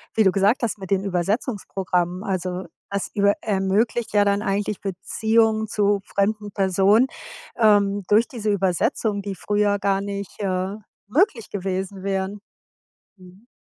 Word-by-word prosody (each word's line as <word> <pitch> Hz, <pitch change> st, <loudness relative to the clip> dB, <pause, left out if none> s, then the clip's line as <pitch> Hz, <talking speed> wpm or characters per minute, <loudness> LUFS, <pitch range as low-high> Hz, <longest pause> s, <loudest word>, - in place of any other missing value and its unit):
wie 220 Hz, -, +4 dB
du 190 Hz, -, +5 dB
gesagt 205 Hz, +6 st, +2 dB
hast 225 Hz, -3 st, -1 dB
mit 190 Hz, -, -8 dB
den 195 Hz, -1 st, +1 dB
Übersetzungsprogrammen, 185 Hz, -2 st, -1 dB
also 185 Hz, -1 st, -3 dB, 0.2 s
das 200 Hz, -1 st, -3 dB
über 200 Hz, -1 st, +3 dB
ermöglicht 210 Hz, +4 st, 0 dB
ja 205 Hz, -1 st, +5 dB
dann 200 Hz, 0 st, +2 dB
eigentlich 205 Hz, 0 st, -1 dB
Beziehungen 220 Hz, +3 st, +1 dB
zu 205 Hz, -1 st, +1 dB
fremden 210 Hz, +1 st, -1 dB
Personen, 195 Hz, +5 st, +3 dB, 0.5 s
ähm, 205 Hz, -2 st, +3 dB
durch 220 Hz, +3 st, +4 dB
diese 215 Hz, -4 st, -3 dB
Übersetzungen, 200 Hz, +2 st, 0 dB
die 195 Hz, -1 st, -5 dB
früher 205 Hz, +2 st, +1 dB
gar 195 Hz, -1 st, +1 dB
nicht, 200 Hz, -1 st, -6 dB
äh, 190 Hz, -1 st, -1 dB, 0.3 s
möglich 265 Hz, -, +1 dB
gewesen 190 Hz, 0 st, -4 dB
wären. 195 Hz, +1 st, -2 dB, 0.8 s
Mhm. 185 Hz, +4 st, -17 dB
200 Hz, 135 wpm, -23 LUFS, 190-210 Hz, 0.8 s, du